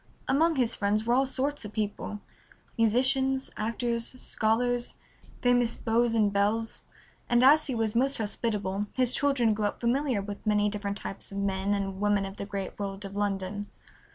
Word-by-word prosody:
Among 320 Hz, +4 st, +3 dB
his 245 Hz, -4 st, +2 dB
friends 210 Hz, +2 st, 0 dB
were 235 Hz, -, +2 dB
all 265 Hz, +2 st, +3 dB
sorts 275 Hz, +2 st, -1 dB
of 210 Hz, 0 st, -8 dB
people, 210 Hz, -1 st, -3 dB, 0.5 s
musicians, 265 Hz, +4 st, +2 dB
actors, 235 Hz, +2 st, -2 dB
scholars, 240 Hz, +2 st, 0 dB, 0.5 s
famous 245 Hz, -1 st, +3 dB
beaux 230 Hz, 0 st, +1 dB
and 210 Hz, -2 st, +2 dB
belles, 215 Hz, +3 st, 0 dB, 0.4 s
and 240 Hz, +1 st, +4 dB
as 300 Hz, +4 st, +6 dB
he 260 Hz, -, -2 dB
was 225 Hz, -2 st, 0 dB
most 270 Hz, +4 st, +2 dB
hospitable 205 Hz, -2 st, -2 dB
his 255 Hz, -1 st, +3 dB
children 265 Hz, -6 st, +2 dB
grew 210 Hz, 0 st, -1 dB
up 205 Hz, -, -2 dB
familiar 245 Hz, -2 st, 0 dB
with 205 Hz, 0 st, -7 dB
many 210 Hz, -1 st, +2 dB
different 205 Hz, -1 st, -3 dB
types 195 Hz, -, -5 dB
of 195 Hz, -, -6 dB
men 200 Hz, 0 st, 0 dB
and 195 Hz, -1 st, -3 dB
women 205 Hz, -1 st, +2 dB
of 195 Hz, +1 st, -8 dB
the 200 Hz, -, -5 dB
great 200 Hz, -1 st, -5 dB
world 200 Hz, 0 st, -4 dB
of 195 Hz, 0 st, -8 dB
London. 205 Hz, 0 st, -2 dB
220 Hz, 170 wpm, -28 LUFS, 205-245 Hz, 0.5 s, as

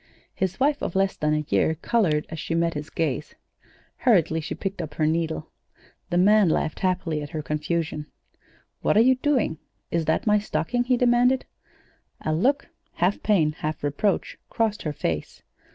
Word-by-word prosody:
His 190 Hz, +3 st, -2 dB
wife 290 Hz, +2 st, +2 dB
of -, -, -3 dB
less 195 Hz, 0 st, +2 dB
than 150 Hz, 0 st, +1 dB
a 150 Hz, 0 st, -1 dB
year 160 Hz, -, +2 dB
colored 165 Hz, -4 st, +1 dB
as 160 Hz, -, -6 dB
she 165 Hz, -, -2 dB
met 165 Hz, 0 st, +1 dB
his 150 Hz, 0 st, -6 dB
gaze. 150 Hz, -2 st, -2 dB, 0.6 s
Hurriedly 170 Hz, -, +3 dB
she -, -, -5 dB
picked 195 Hz, -2 st, -4 dB
up 155 Hz, -3 st, -7 dB
her 155 Hz, -, +1 dB
needle. 160 Hz, 0 st, -1 dB, 0.6 s
The 175 Hz, -, 0 dB
man 205 Hz, +1 st, +5 dB
laughed 155 Hz, -, 0 dB
happily 180 Hz, -4 st, 0 dB
at 145 Hz, -, -6 dB
her 155 Hz, -3 st, -4 dB
confusion. 150 Hz, 0 st, -2 dB, 0.7 s
"What -, -, +2 dB
are -, -, +8 dB
you 255 Hz, +3 st, +6 dB
doing? 255 Hz, -, 0 dB, 0.3 s
Is 170 Hz, -1 st, 0 dB
that 160 Hz, -, +1 dB
my 210 Hz, -1 st, +4 dB
stocking?" 245 Hz, +3 st, -1 dB
he 250 Hz, 0 st, +2 dB
demanded. 250 Hz, +1 st, +3 dB, 0.8 s
A 155 Hz, -, -1 dB
look, 265 Hz, -, +1 dB, 0.3 s
half 180 Hz, +4 st, 0 dB
pain, 170 Hz, -8 st, +3 dB
half 155 Hz, 0 st, -5 dB
reproach, 145 Hz, +8 st, -1 dB
crossed 220 Hz, -2 st, 0 dB
her 150 Hz, -, -3 dB
face. 80 Hz, -, -4 dB
170 Hz, 170 wpm, -25 LUFS, 155-215 Hz, 0.8 s, are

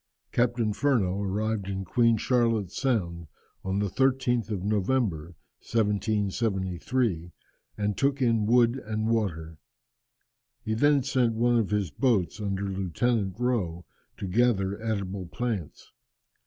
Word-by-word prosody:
Captain 120 Hz, -3 st, +1 dB
Furneaux 105 Hz, -6 st, +1 dB
arrived 100 Hz, +1 st, -1 dB
in 95 Hz, 0 st, -3 dB
Queen 115 Hz, +3 st, +3 dB
Charlotte's 115 Hz, -5 st, +1 dB
Sound 85 Hz, -, -1 dB, 0.4 s
on 95 Hz, +1 st, -1 dB
the 105 Hz, -, +1 dB
13th 125 Hz, 0 st, +1 dB
of 100 Hz, -4 st, -3 dB
November, 100 Hz, -5 st, 0 dB, 0.3 s
1773, 105 Hz, -2 st, -1 dB, 0.5 s
and 105 Hz, -1 st, -1 dB
took 140 Hz, 0 st, +1 dB
in 115 Hz, -4 st, +2 dB
wood 120 Hz, +2 st, +3 dB
and 110 Hz, 0 st, -2 dB
water. 80 Hz, -8 st, -2 dB, 1.0 s
He 110 Hz, -, -1 dB
then 145 Hz, +4 st, +3 dB
sent 125 Hz, -4 st, +1 dB
one 120 Hz, +1 st, +3 dB
of 110 Hz, -, -1 dB
his 100 Hz, -6 st, 0 dB
boats 110 Hz, -, +1 dB
under 100 Hz, -1 st, -2 dB
Lieutenant 95 Hz, +2 st, -1 dB
Rowe 95 Hz, -9 st, -1 dB, 0.3 s
to -, -, -5 dB
gather 100 Hz, -1 st, +1 dB
edible 100 Hz, -4 st, -3 dB
plants. 105 Hz, -, -4 dB
105 Hz, 120 wpm, -27 LUFS, 95-120 Hz, 1.0 s, Queen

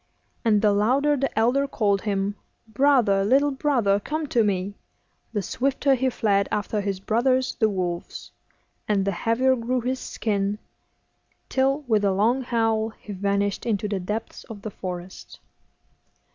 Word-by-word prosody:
And 215 Hz, -2 st, +3 dB
the 210 Hz, -, +5 dB
louder 260 Hz, +9 st, +2 dB
the 275 Hz, -3 st, -2 dB
elder 250 Hz, +5 st, +2 dB
called 200 Hz, -6 st, +1 dB
him, 200 Hz, -1 st, -1 dB, 0.3 s
'Brother, 225 Hz, -5 st, +3 dB
little 275 Hz, +7 st, +3 dB
brother, 255 Hz, -8 st, +1 dB
come 310 Hz, +8 st, -3 dB
to 235 Hz, -3 st, +3 dB
me,' 200 Hz, -1 st, -1 dB, 0.6 s
the 205 Hz, -3 st, -2 dB
swifter 275 Hz, +6 st, +1 dB
he 260 Hz, 0 st, +1 dB
fled 200 Hz, -4 st, +1 dB
after 210 Hz, 0 st, -1 dB
his 200 Hz, -2 st, -3 dB
brothers 255 Hz, +6 st, +1 dB
the 220 Hz, -2 st, +2 dB
wolves, 180 Hz, -3 st, -4 dB, 0.6 s
and 200 Hz, -2 st, +1 dB
the 200 Hz, -, +1 dB
heavier 230 Hz, +7 st, +2 dB
grew 250 Hz, +1 st, -1 dB
his 255 Hz, +2 st, -2 dB
skin, 205 Hz, -4 st, -2 dB, 0.9 s
till, 270 Hz, +2 st, +1 dB
with 220 Hz, -7 st, +1 dB
a 200 Hz, -1 st, +2 dB
long 230 Hz, +7 st, +2 dB
howl, 225 Hz, -3 st, 0 dB
he 210 Hz, -, -8 dB
vanished 200 Hz, +1 st, -1 dB
into 210 Hz, -3 st, -1 dB
the 200 Hz, -2 st, -2 dB
depths 210 Hz, +5 st, -5 dB
of 205 Hz, -3 st, -10 dB
the 215 Hz, -, -5 dB
forest. 180 Hz, -1 st, -8 dB
220 Hz, 150 wpm, -24 LUFS, 200-255 Hz, 0.9 s, the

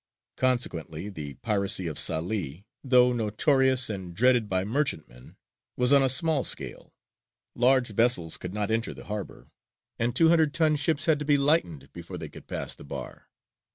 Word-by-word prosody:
Consequently 100 Hz, -9 st, -2 dB
the 75 Hz, -8 st, -8 dB
piracy 100 Hz, -5 st, +1 dB
of 80 Hz, -3 st, -5 dB
Salē, 85 Hz, 0 st, +1 dB, 0.2 s
though 125 Hz, -2 st, +3 dB
notorious 130 Hz, +3 st, +1 dB
and 95 Hz, -5 st, -7 dB
dreaded 120 Hz, 0 st, +2 dB
by 95 Hz, 0 st, 0 dB
merchantmen, 100 Hz, -, -4 dB, 0.4 s
was 125 Hz, +2 st, +3 dB
on 140 Hz, -, +6 dB
a 135 Hz, -, +2 dB
small 145 Hz, +1 st, +3 dB
scale; -, -, -2 dB, 0.6 s
large 125 Hz, 0 st, +2 dB
vessels 110 Hz, -7 st, +2 dB
could 90 Hz, -, -8 dB
not 105 Hz, +1 st, -3 dB
enter 115 Hz, 0 st, -2 dB
the -, -, -12 dB
harbour, 105 Hz, -1 st, -8 dB, 0.5 s
and 120 Hz, +1 st, -1 dB
two 160 Hz, +5 st, +4 dB
hundred 160 Hz, -3 st, +2 dB
ton 160 Hz, -2 st, +2 dB
ships 150 Hz, +1 st, 0 dB
had 160 Hz, -3 st, +2 dB
to 150 Hz, -, -5 dB
be 145 Hz, 0 st, +3 dB
lightened 140 Hz, -, -1 dB
before 85 Hz, +1 st, -9 dB
they 80 Hz, -2 st, -8 dB
could -, -, -14 dB
pass -, -, -4 dB
the -, -, -13 dB
bar. 70 Hz, -, -9 dB
115 Hz, 165 wpm, -26 LUFS, 90-135 Hz, 0.6 s, on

